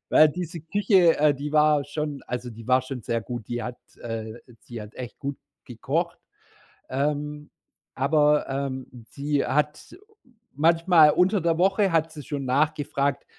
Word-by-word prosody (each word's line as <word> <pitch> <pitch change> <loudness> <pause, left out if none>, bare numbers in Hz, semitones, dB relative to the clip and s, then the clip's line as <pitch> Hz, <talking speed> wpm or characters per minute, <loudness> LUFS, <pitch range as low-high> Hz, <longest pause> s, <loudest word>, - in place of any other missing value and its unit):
weil 155 - +7
diese 170 +1 -5
Küche, 185 0 +3
äh, 150 0 +4
die 145 +2 -6
war 150 -1 +4
schon 145 -1 -4
also, 125 0 -4
die 115 0 -11
war 130 0 +4
schon 130 -1 -6
sehr 115 -1 -2
gut, 120 -3 -7
die 120 -1 -3
hat, 125 +2 -6 0.2
äh 110 -1 -5 0.3
sie 120 -2 -9
hat 105 +1 -12
echt 125 -2 -8
gut 140 0 -5 0.3
gekocht. - - -3 0.7
Ähm, 150 +2 -2 0.4
aber, 150 +2 +2
ähm, 135 -1 -3 0.2
sie 145 0 -1
hat 150 +2 -1 0.6
manchmal 165 +1 +5
unter 190 +6 +2
der 165 -1 +1
Woche 195 +1 +2
hat 165 -1 +1
sie 150 -3 -9
schon 140 -1 -4
nachgefragt, 140 0 0
145 Hz, 150 wpm, -25 LUFS, 130-155 Hz, 0.7 s, weil